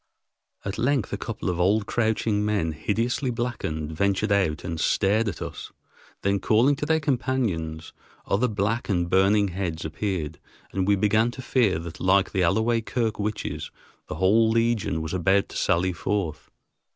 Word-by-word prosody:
At 100 0 -4
length 130 -4 +1
a - - -1
couple - - -5
of 90 -1 -1
old, 100 +4 +3
crouching 110 -2 0
men, 105 -6 0
hideously 115 - -1
blackened, 110 -11 -3
ventured 100 +5 0
out 95 -7 +1
and 85 -2 -4
stared 105 +7 +2
at 95 - -3
us, - - -7 0.5
then, 100 0 +2
calling 115 +8 +3
to 150 - -3
their 160 0 +3
companions, 120 - -2 0.3
other 115 +6 +1
black 105 +2 -1
and 85 -3 0
burning 100 +2 +4
heads 85 -3 -3
appeared, 80 -1 -3 0.3
and 95 -1 -1
we 100 - +5
began 110 +4 +2
to 130 +2 -8
fear 115 -11 +2
that 80 0 -8
like 95 +1 +3
the 95 - 0
Alloway 110 +6 +2
Kirk 115 -1 -2
witches 105 +1 -3 0.4
the - - -5
whole 110 +4 +4
legion 115 -7 +1
was 80 - -5
about 95 +2 +2
to - - -11
sally 90 +2 +1
forth. 85 -2 -3
100 Hz, 165 wpm, -25 LUFS, 90-115 Hz, 0.5 s, we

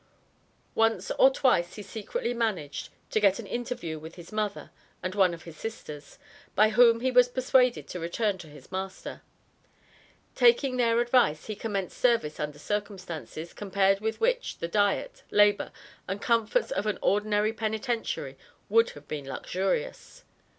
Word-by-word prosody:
Once 225 0 +1
or 265 - +8
twice 250 -10 +2
he 210 - -7
secretly 220 +4 -3
managed 210 -11 -2 0.2
to - - +2
get 200 -2 +4
an - - -7
interview 240 -10 -4
with 160 +2 -10
his 175 -2 -12
mother 215 -1 -3 0.3
and 185 +1 -2
one 190 -3 +4
of 170 -1 -8
his 165 -2 -11
sisters, 150 -9 -8 0.4
by 215 +2 +5
whom 230 +1 +5
he 260 +1 +1
was 250 0 +6
persuaded 255 -1 +2
to 180 - -6
return 195 +5 0
to 175 -3 -11
his 145 0 -15
master. 190 0 -5 1.1
Taking 285 - +4
their 235 -1 +3
advice, 240 -11 +2
he 215 - -4
commenced 200 -3 -4
service 230 -12 +2
under 150 -1 -3
circumstances, 185 -4 -5
compared 195 -1 +1
with 220 +1 -2
which, - - 0
the 170 - -3
diet, 205 - 0
labor 205 0 +3 0.4
and 190 +2 -3
comforts 235 - +1
of 205 - -1
an 210 - 0
ordinary 210 +1 +2
penitentiary 220 - -3 0.3
would 230 +2 +4
have 145 - -14
been 145 -3 -5
luxurious. 460 - -3
210 Hz, 150 wpm, -28 LUFS, 180-235 Hz, 1.1 s, or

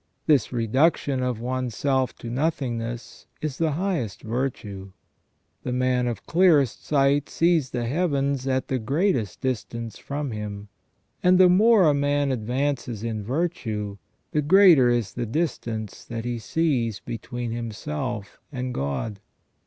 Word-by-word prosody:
This 150 -4 +3
reduction 130 +3 +2
of 125 -3 -1
one's 125 -1 -3
self 130 0 0
to 115 - -7
nothingness 120 -5 -3
is 150 -4 -4
the 160 -2 +1
highest 160 - -2
virtue. 110 -5 -4 0.7
The 125 - -4
man 125 -1 +1
of 115 -4 -4
clearest 160 - +3
sight 140 0 +2
sees 165 -5 +2
the 120 -2 -2
heavens 140 -2 0
at 130 0 0
the 130 - -1
greatest 135 - 0
distance 115 -3 -3
from 145 -1 -4
him; 105 -1 -6 0.5
and 180 0 +5
the 185 -1 +7
more 210 +3 +6
a 150 -3 +5
man 145 0 +1
advances 125 -1 -2
in 110 -2 -3
virtue 110 - -2 0.3
the 150 - +1
greater 160 -5 +6
is 120 -5 0
the 120 -1 -3
distance 115 - -3
that 115 0 -5
he 120 -1 -2
sees 120 -5 0
between 120 +1 -5
himself 120 0 -4
and 125 -2 -3
God. 70 +10 -3
130 Hz, 135 wpm, -25 LUFS, 115-145 Hz, 0.7 s, the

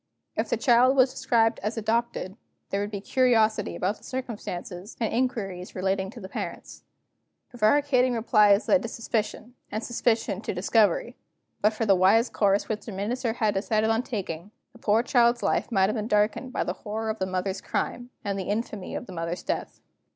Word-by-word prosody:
If - - -1
the - - +1
child 255 +1 +4
was 255 -1 +5
described 235 -4 +2
as 215 +3 -3
adopted, 225 -3 -1 0.4
there 195 - 0
would 205 - -2
be 200 -2 -5
curiosity 225 -3 +2
about 200 +4 -1
the - - -24
circumstances, 205 -7 -6
and 225 - -1
inquiries 205 -7 -2
relating 190 +1 -1
to 235 - -10
the 190 - -8
parents. - - -6 0.7
Prevaricating 255 +2 +3
replies 210 -2 +4
lead 280 - +4
to 230 - -4
suspicion, 230 +1 -3 0.2
and 215 +2 -3
suspicion 225 -4 0
to - - -4
discovery. 220 - +2 0.4
But 210 +1 +3
for 225 +1 -1
the 200 - +5
wise 195 +6 +4
course 200 -1 +2
which 215 +1 -4
the - - -4
Minister 225 +5 -2
had 215 -3 +1
decided 215 +3 +1
on 225 +1 +2
taking, 195 -7 -5 0.2
the 235 - -16
poor 220 +1 +2
child's 240 -1 +3
life - - 0
might 190 -4 +4
have 215 - -1
been 215 -1 -2
darkened 210 +4 +1
by - - -1
the - - -2
horror 220 +1 -4
of 220 - -7
the 190 - -1
mother's 190 +1 -2
crime, 245 0 -3 0.2
and 200 -1 -1
the 190 - -4
infamy 210 -2 -3
of - - -4
the 190 - -10
mother's 165 +1 -4
death. - - -4
220 Hz, 190 wpm, -26 LUFS, 195-235 Hz, 0.7 s, was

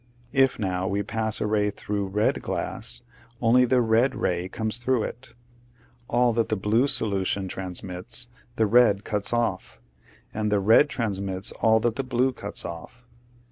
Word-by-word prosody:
If 135 -1 +3
now 95 -3 -2
we 100 0 -1
pass 110 +1 -2
a - - -1
ray 105 -1 +1
through 100 0 -3
red 105 +3 0
glass, - - -3 0.4
only 125 +2 +4
the 125 0 +3
red 115 +3 +2
ray 90 +1 -1
comes 110 +3 -3
through 120 -2 +1
it; 120 +1 -8 0.7
all 120 0 +2
that 115 -1 0
the 110 - +1
blue 110 +6 +2
solution 100 -7 0
transmits 95 +5 -4 0.3
the 110 - +2
red 110 -2 +4
cuts 105 -2 -2
off, 120 -1 -2 0.5
and 105 -1 -1
the 105 - +3
red 110 +9 +5
transmits 100 -6 -2
all 110 0 +3
that 115 +1 0
the 135 - -1
blue 130 +1 +1
cuts 105 -3 -6
off. 85 +9 -9
110 Hz, 160 wpm, -25 LUFS, 100-120 Hz, 0.7 s, red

